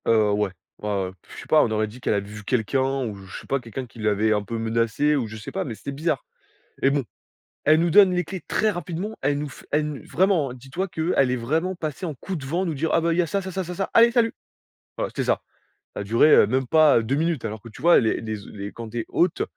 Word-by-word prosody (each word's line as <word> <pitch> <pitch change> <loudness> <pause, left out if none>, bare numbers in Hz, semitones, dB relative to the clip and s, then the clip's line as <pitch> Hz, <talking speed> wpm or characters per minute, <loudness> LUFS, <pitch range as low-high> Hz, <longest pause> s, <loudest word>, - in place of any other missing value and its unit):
Heu, 110 -2 +4
ouais. 105 -1 0 0.3
Ouais, 105 - -4
ouais. 90 - -4
Puis, - - -17
je - - -8
sais - - -11
pas, 155 - +5
on - - 0
aurait 110 0 +1
dit 110 +4 -11
qu'elle 110 - +1
avait 100 0 -2
vu 105 +1 -9
quelqu'un 130 +4 0
ou 105 -3 -4
je 95 -1 -9
sais - - -15
pas, 140 - +1
quelqu'un 125 +2 -6
qui 115 -1 -16
l'avait 110 0 +2
un 105 - +1
peu 115 +3 -4
menacée 115 +6 +1
ou 130 -6 -1
je 110 +1 -8
sais 105 - -8
pas, - - -2
mais 115 - -5
c'était 140 - -6
bizarre 160 - -1 0.6
et 135 - +5
bon, 140 -1 0 0.6
elle 155 +2 +5
nous 170 +1 +2
donne 195 +1 +7
les 180 0 +1
clés 190 -1 -6
très 215 - +2
rapidement. 180 +3 -4
Elle 145 +1 +1
nous 150 0 -4
f - - -13
elle 150 +1 +1
nous 150 -2 -6
vraiment, 175 -7 +2
dis 130 +1 -13
toi 190 +6 -1
qu'elle 160 -6 +1
est - - +1
vraiment 160 +10 -1
passée 160 +1 -4
en 155 - -3
coup 190 +8 -5
de 150 - -6
vent 170 +7 -1
nous 165 - -1
dire: 160 +4 -1
«Ah, - - +4
bah, 165 0 +1
il - - -2
y - - +7
a 170 - -1
ça, 200 +6 0
ça, 190 0 -6
ça, 190 +1 -2
ça, 180 +1 -6
ça, 195 - -2
allez 230 +1 +7
salut!» 230 -2 +2 0.6
Voilà, - - -2
c'était - - -2
ça. - - +1 0.5
Ça - - -4
a - - -7
duré, 115 +8 +4
heu, - - +7
même 130 +3 0
pas, 155 -1 +5
heu, 115 - -1
2 125 +5 0
minutes, 160 -4 0
alors 110 -1 -4
que, 115 - -10
tu 110 - -13
vois, 170 +2 +6
les 110 - 0
les 110 -1 -4
e 100 0 -7
quand 115 -1 -7
tu 120 - -4
es - - -3
hôte, 175 -1 +1
135 Hz, 290 wpm, -24 LUFS, 110-170 Hz, 0.6 s, donne